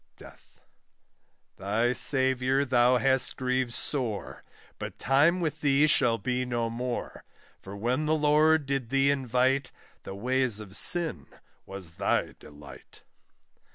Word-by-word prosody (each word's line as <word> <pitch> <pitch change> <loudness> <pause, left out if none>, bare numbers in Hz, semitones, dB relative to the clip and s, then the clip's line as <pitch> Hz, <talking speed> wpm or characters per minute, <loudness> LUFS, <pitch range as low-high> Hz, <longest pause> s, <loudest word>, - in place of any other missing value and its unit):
DEATH. - - -18 1.0
Thy 115 +5 -1
Saviour 130 +1 +4
thou 125 -1 +2
hast 130 0 +2
grieved 130 -1 -2
sore, 120 -8 -3 0.4
But - - -8
time 150 +7 +2
with 155 -2 -4
thee 145 0 +3
shall 120 -6 +3
be 125 +1 -3
no 120 -2 -3
more; 120 +1 -6 0.4
For 100 +1 -10
when 125 +8 -2
the 155 - +1
Lord 155 0 +2
did 135 -3 -3
thee 135 +1 +2
invite, 130 0 -1 0.3
The 95 - -9
ways 125 +1 -1
of 100 -3 -10
sin 165 - +1 0.4
was 95 -4 -7
thy - - -1
delight. 75 0 -16
130 Hz, 125 wpm, -26 LUFS, 115-140 Hz, 1.0 s, Saviour